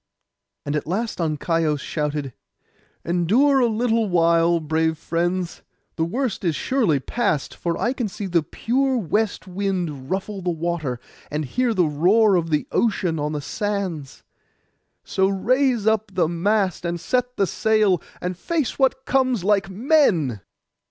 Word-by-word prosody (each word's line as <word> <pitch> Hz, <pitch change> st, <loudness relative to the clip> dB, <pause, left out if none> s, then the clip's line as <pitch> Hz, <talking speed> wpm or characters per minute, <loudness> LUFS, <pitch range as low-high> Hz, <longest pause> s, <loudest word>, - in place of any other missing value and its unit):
And 145 Hz, -, -2 dB
at 150 Hz, -, -2 dB
last 215 Hz, +6 st, -2 dB
Ancaios 160 Hz, -1 st, 0 dB
shouted, 150 Hz, -3 st, -3 dB, 0.7 s
'Endure 220 Hz, -, +3 dB
a 245 Hz, -, +4 dB
little 225 Hz, -1 st, +1 dB
while, 170 Hz, -1 st, +3 dB
brave 160 Hz, +1 st, 0 dB
friends, 175 Hz, +2 st, -2 dB, 0.3 s
the 160 Hz, -, 0 dB
worst 230 Hz, +4 st, -2 dB
is 165 Hz, -4 st, +1 dB
surely 220 Hz, -, +1 dB
past; 155 Hz, -, -1 dB
for 170 Hz, -2 st, -3 dB
I 240 Hz, -, +1 dB
can 245 Hz, -4 st, -2 dB
see 205 Hz, +1 st, -6 dB
the 175 Hz, -3 st, +2 dB
pure 260 Hz, -, 0 dB
west 215 Hz, 0 st, -1 dB
wind 180 Hz, -8 st, -3 dB
ruffle 195 Hz, +1 st, -3 dB
the 180 Hz, -, -1 dB
water, 165 Hz, -6 st, -2 dB, 0.3 s
and 150 Hz, +1 st, -2 dB
hear 240 Hz, -, 0 dB
the 180 Hz, -3 st, +3 dB
roar 190 Hz, +8 st, +4 dB
of 165 Hz, -2 st, 0 dB, 0.2 s
ocean 185 Hz, -8 st, 0 dB
on 150 Hz, +1 st, -2 dB
the 150 Hz, -, -3 dB
sands. 190 Hz, -6 st, -4 dB, 0.8 s
So 190 Hz, 0 st, +1 dB
raise 240 Hz, +4 st, +1 dB
up 220 Hz, -1 st, +1 dB
the 175 Hz, -3 st, +3 dB
mast, 185 Hz, +2 st, 0 dB
and 170 Hz, 0 st, -2 dB
set 250 Hz, +6 st, -1 dB
the 195 Hz, -, +3 dB
sail, 210 Hz, -3 st, +2 dB, 0.2 s
and 180 Hz, +1 st, -3 dB
face 305 Hz, -, -2 dB
what 265 Hz, 0 st, +2 dB
comes 255 Hz, -7 st, +1 dB
like 200 Hz, 0 st, +2 dB
men. 190 Hz, -, +2 dB
185 Hz, 145 wpm, -22 LUFS, 165-225 Hz, 0.8 s, a